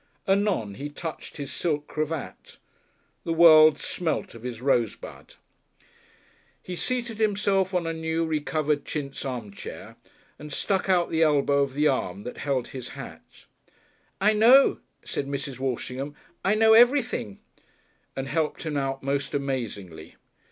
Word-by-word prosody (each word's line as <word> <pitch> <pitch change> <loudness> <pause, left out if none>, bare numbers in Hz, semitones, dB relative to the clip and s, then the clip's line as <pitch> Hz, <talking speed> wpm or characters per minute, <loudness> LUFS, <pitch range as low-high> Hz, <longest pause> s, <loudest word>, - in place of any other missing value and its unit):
Anon 195 - +1
he 145 +2 -5
touched 160 +2 -7
his 140 -2 -5
silk 150 -4 -1
cravat. 155 -1 -5 0.7
The 165 - -1
world 155 -2 +8
smelt 160 +2 -3
of 115 - -12
his 120 -2 -6
rosebud. 120 -4 -2 1.2
He 180 - -7
seated 235 +1 -3
himself 200 -3 +1
on 175 -2 +1
a 165 - -2
new 160 0 -1
re 160 -1 0
covered 150 0 -1
chintz 140 -3 -5
armchair 120 -7 -7 0.4
and 150 0 -9
stuck 195 +5 -1
out 175 -2 +2
the 160 - +1
elbow 140 -2 +3
of 135 -1 -1
the 150 +1 +3
arm 100 -8 -1
that 125 - -7
held 135 -4 -1
his 130 -3 -7
hat. - - -11 0.7
"I 210 +3 +4
know," 240 +6 +6 0.3
said 140 - -3
Mrs. 140 -2 -5
Walshingham, 135 +2 -3 0.3
"I 200 +3 +3
know 220 0 +5
everything," 240 - +3 0.8
and 135 0 -4
helped 155 +2 -1
him 150 -2 -2
out 135 -1 -2
most 140 +1 -2
amazingly. 105 - -4
150 Hz, 140 wpm, -26 LUFS, 135-175 Hz, 1.2 s, world